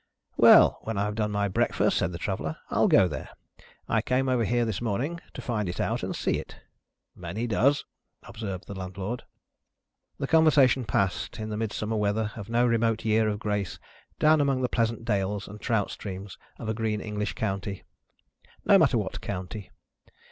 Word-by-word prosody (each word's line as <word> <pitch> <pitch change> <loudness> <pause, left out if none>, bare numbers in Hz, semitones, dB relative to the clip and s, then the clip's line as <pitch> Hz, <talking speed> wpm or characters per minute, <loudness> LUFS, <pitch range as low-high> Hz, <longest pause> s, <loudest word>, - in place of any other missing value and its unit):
"Well! - - +7
When 110 -2 -4
I 100 - +1
have 105 0 -2
done 105 0 -1
my 100 0 0
breakfast," 95 - +1
said - - 0
the 85 - -5
Traveller, 85 -5 -3
"I'll - - +3
go 95 - +5
there. 75 - -6 0.6
I - - +2
came 130 +1 0
over 125 -2 +2
here 120 +2 +1
this 110 -2 -3
morning, 120 +10 -2 0.2
to - - -7
find 105 -6 -1
it 90 - -5
out - - 0
and - - -3
see - - 0
it." - - -9 0.6
"Many 90 +6 -4
does," 130 +6 +2 0.4
observed 100 -4 -6
the - - -7
Landlord. 95 +5 -5 0.9
The 140 - -2
conversation 140 -5 +4
passed, 100 -2 -1
in 110 0 -5
the 105 - -3
Midsummer 110 0 -2
weather 105 +1 0
of 105 -1 -8
no 120 +1 +3
remote 115 -1 +1
year 110 0 +3
of 105 -1 -1
grace, 105 -3 -2 0.4
down 155 0 +5
among 135 -2 +1
the 125 - +1
pleasant 115 -1 -1
dales 105 -2 -1
and 105 +1 -10
trout 110 -5 0
streams 95 -1 -7 0.2
of 115 - -7
a 110 - 0
green 110 -1 -1
English 105 0 -3
county. 100 -2 -3 0.8
No - - +7
matter - - +4
what - - -3
county. 95 +1 -5
110 Hz, 180 wpm, -27 LUFS, 100-115 Hz, 0.9 s, Well